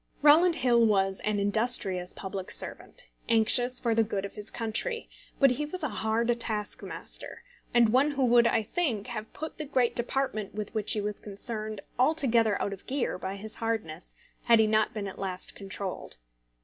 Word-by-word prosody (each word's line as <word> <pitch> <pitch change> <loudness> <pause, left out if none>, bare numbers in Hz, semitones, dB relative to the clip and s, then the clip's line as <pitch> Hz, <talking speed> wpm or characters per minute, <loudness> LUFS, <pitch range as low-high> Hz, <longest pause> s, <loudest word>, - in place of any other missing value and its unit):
Rowland 325 +4 +6
Hill 240 -6 +3
was 195 -3 +2
an 210 -1 -1
industrious 200 -3 +2
public 190 -1 -6
servant, - - -2 0.2
anxious 245 +2 +4
for 230 -2 +1
the 225 0 +3
good 200 -2 -3
of 200 - -8
his 210 0 -3
country; 240 - -2 0.3
but 275 -2 +6
he 295 +4 -1
was 360 +2 -5
a 300 - 0
hard 230 +2 0
taskmaster, 215 - -5 0.3
and 235 -2 +5
one 260 +6 +4
who 275 -3 +1
would, 240 -1 +5
I 225 - +2
think, 230 - -1
have 220 -2 -6
put 315 0 -7
the - - -2
great 255 -4 +1
department 240 -4 -1
with 210 0 -5
which 215 0 0
he 215 - 0
was 210 0 -3
concerned 215 0 -4 0.2
altogether 245 -7 +3
out 200 - -2
of 195 - -12
gear 270 -8 -1
by 190 +1 -4
his 215 +2 -7
hardness, 215 -8 -3 0.3
had 235 -1 +6
he 220 - +5
not 215 0 +2
been 210 -2 -4
at 190 - -8
last 185 -2 -3
controlled. 195 -1 -6
220 Hz, 180 wpm, -28 LUFS, 205-245 Hz, 0.3 s, Rowland